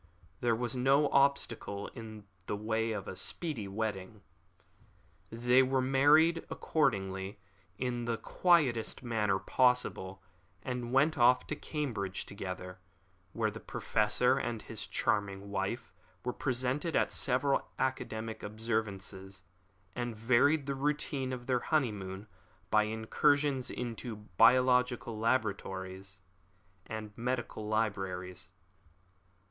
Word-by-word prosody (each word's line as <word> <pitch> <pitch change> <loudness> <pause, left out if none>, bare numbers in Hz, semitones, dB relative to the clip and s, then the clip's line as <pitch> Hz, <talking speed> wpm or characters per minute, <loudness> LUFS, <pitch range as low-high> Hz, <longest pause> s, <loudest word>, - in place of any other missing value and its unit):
There 120 -2 +2
was 120 +2 -2
no 135 +3 +4
obstacle 120 -7 +1
in 110 -2 -10 0.2
the - - -1
way 110 +2 -1
of 105 -3 -4
a - - -5
speedy 140 - -3
wedding. 105 0 -4 1.1
They 120 +3 +4
were 130 0 +2
married, 145 +6 +4
accordingly, 95 -8 -1 0.4
in 120 -2 -2
the 115 -1 -1
quietest 140 -12 +2
manner 105 -5 +1
possible, 95 -3 +1 0.4
and 125 -2 -3
went 145 +3 +3
off 125 +1 +5
to 150 - -3
Cambridge 120 - -3
together, 90 -2 -6 0.5
where 110 -2 0
the 115 - -8
Professor - - +1
and - - -3
his - - -7
charming 100 -1 -1
wife 100 +3 -3 0.3
were 125 - -1
present 130 +1 -1
at 165 -2 +1
several 135 +1 +1
academic 115 -4 -2
observances, 100 -3 -4 0.5
and 120 -2 -3
varied 130 +7 +3
the 140 - -1
routine 140 -1 -1
of 125 -1 -5
their 125 -1 +1
honeymoon 105 - -1 0.5
by 110 0 +5
incursions 135 +5 +1
into 120 -1 -5
biological 120 +3 +3
laboratories 95 -5 -2 0.7
and 110 -1 -6
medical 120 -3 -3
libraries. 95 -4 -2
115 Hz, 110 wpm, -32 LUFS, 100-130 Hz, 1.1 s, off